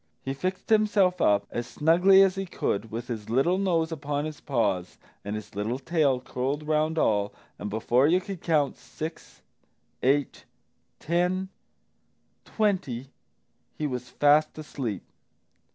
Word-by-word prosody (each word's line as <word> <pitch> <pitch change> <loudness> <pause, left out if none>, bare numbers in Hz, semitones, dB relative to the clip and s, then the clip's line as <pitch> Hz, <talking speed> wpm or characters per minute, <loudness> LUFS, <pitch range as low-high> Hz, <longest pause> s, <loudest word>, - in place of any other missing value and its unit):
He 135 - -2
fixed 185 +9 -4
himself 205 -4 +3
up 100 0 +3
as 120 0 -3
snugly 180 +5 +5
as 190 -1 +3
he 195 0 -4
could, 110 -9 -2
with 115 +2 -5
his 110 -4 -5
little 140 +11 +2
nose 170 -4 +1
upon 145 -1 -2
his 155 -1 -7
paws 100 -9 -1 0.3
and 105 +1 -4
his 105 - -8
little 105 +5 -2
tail 140 -2 +1
curled 135 +4 -3
round 155 +1 +1
all, 105 -7 +2 0.3
and 105 - -4
before 120 +5 +2
you 175 +4 +4
could 190 -1 -7
count 150 -4 +1
six, 160 +2 -8 0.6
eight, 140 +2 +1 0.5
ten, 180 +3 0 1.0
twenty, 140 - -1 0.7
he 155 - -2
was 125 -3 -4
fast 150 +4 +3
asleep. 130 - -5
145 Hz, 135 wpm, -27 LUFS, 120-175 Hz, 1.0 s, snugly